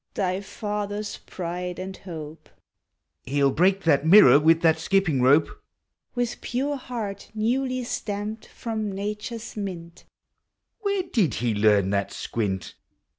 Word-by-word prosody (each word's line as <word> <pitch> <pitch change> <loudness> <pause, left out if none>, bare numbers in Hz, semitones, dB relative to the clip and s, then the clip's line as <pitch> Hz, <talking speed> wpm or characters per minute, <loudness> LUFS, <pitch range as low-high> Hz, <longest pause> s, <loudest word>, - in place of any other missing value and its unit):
Thy 185 0 0
father's 205 0 -4
pride 180 0 -5
and 190 +1 -6
hope! 160 -4 -9 0.8
(lie 130 - -6
'11 140 -2 +3
break 190 +4 +3
that 145 -4 +3
mirror 165 -3 +8
with 165 +2 +4
that 160 -1 +4
skipping 165 -6 +1
rope! 140 +5 +5 0.4
) - - -50
With 245 -1 -2
pure 275 +4 -1
heart 230 -7 -6
newly 255 +3 0
stamped 215 -1 -4
from 220 -3 -4
nature's 210 +4 -5
mint, 175 -5 -6 0.7
(Where 400 -3 0
did 220 - +1
he 115 0 0
learn 105 -2 +3
that 100 -1 0
squint?) 100 -5 -3
195 Hz, 130 wpm, -25 LUFS, 160-215 Hz, 0.8 s, mirror